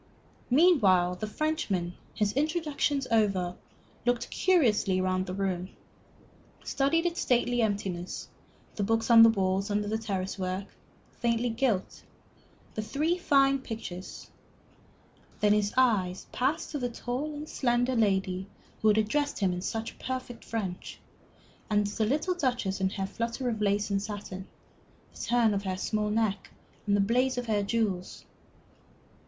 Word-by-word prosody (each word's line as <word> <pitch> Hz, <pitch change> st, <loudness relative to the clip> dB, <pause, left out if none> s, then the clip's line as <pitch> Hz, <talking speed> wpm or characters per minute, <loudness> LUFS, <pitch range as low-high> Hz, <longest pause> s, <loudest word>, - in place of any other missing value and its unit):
Meanwhile 205 Hz, -, +4 dB
the 215 Hz, -, -4 dB
Frenchman, 210 Hz, -, -1 dB, 0.2 s
his 210 Hz, -1 st, +1 dB
introductions 295 Hz, -2 st, 0 dB
over, 195 Hz, -5 st, +2 dB, 0.5 s
looked 245 Hz, -1 st, 0 dB
curiously 225 Hz, -, +3 dB
round 185 Hz, 0 st, 0 dB
the 180 Hz, -, -4 dB
room, 185 Hz, -2 st, -2 dB, 0.9 s
studied 310 Hz, +5 st, +1 dB
its 345 Hz, 0 st, -1 dB
stately 245 Hz, -1 st, +2 dB
emptiness, 195 Hz, -5 st, -2 dB, 0.5 s
the -, -, -1 dB
books 225 Hz, +3 st, +1 dB
on 230 Hz, -1 st, +9 dB
the 230 Hz, -, +9 dB
walls 195 Hz, -1 st, 0 dB
under 205 Hz, +1 st, -1 dB
a -, -, +2 dB
trellis 195 Hz, -3 st, -3 dB
work, 185 Hz, +1 st, -2 dB, 0.5 s
faintly 235 Hz, 0 st, 0 dB
gilt, 225 Hz, -5 st, -1 dB, 0.7 s
the 215 Hz, -, -2 dB
three 290 Hz, +10 st, 0 dB
fine 275 Hz, -5 st, +3 dB
pictures; 220 Hz, -7 st, -7 dB, 1.1 s
then 210 Hz, 0 st, +4 dB
his 210 Hz, -1 st, +1 dB
eyes 200 Hz, -8 st, +2 dB
passed 295 Hz, +6 st, -1 dB
to 295 Hz, -, -3 dB
the 245 Hz, -1 st, -1 dB
tall 255 Hz, +6 st, -4 dB
and 300 Hz, +1 st, -6 dB
slender 245 Hz, -1 st, +1 dB
lady 190 Hz, -4 st, +1 dB, 0.3 s
who 220 Hz, -, +3 dB
had 215 Hz, 0 st, +5 dB
addressed 285 Hz, +7 st, +1 dB
him 190 Hz, -3 st, +1 dB
in 180 Hz, -, -4 dB
such 225 Hz, +3 st, -4 dB
perfect 255 Hz, -2 st, -5 dB
French, 195 Hz, -6 st, -5 dB, 0.7 s
and 210 Hz, -1 st, +2 dB
to 205 Hz, -, -5 dB
the 220 Hz, -, +3 dB
little 305 Hz, -, +1 dB
Duchess 245 Hz, -, -1 dB
in 190 Hz, -, +2 dB
her 195 Hz, -1 st, -3 dB
flutter 235 Hz, +5 st, -3 dB
of 220 Hz, -2 st, -3 dB
lace 205 Hz, 0 st, +1 dB
and 195 Hz, 0 st, +1 dB
satin, 200 Hz, -2 st, -6 dB, 0.7 s
the -, -, -13 dB
turn 235 Hz, -3 st, +3 dB
of 200 Hz, -, -1 dB
her 190 Hz, -2 st, -3 dB
small 210 Hz, +2 st, -1 dB
neck, 210 Hz, -2 st, 0 dB, 0.4 s
and 200 Hz, -, +3 dB
the -, -, +3 dB
blaze 250 Hz, +5 st, +2 dB
of 245 Hz, -, -2 dB
her 215 Hz, -3 st, +1 dB
jewels. 200 Hz, -3 st, -2 dB
220 Hz, 150 wpm, -29 LUFS, 195-250 Hz, 1.1 s, on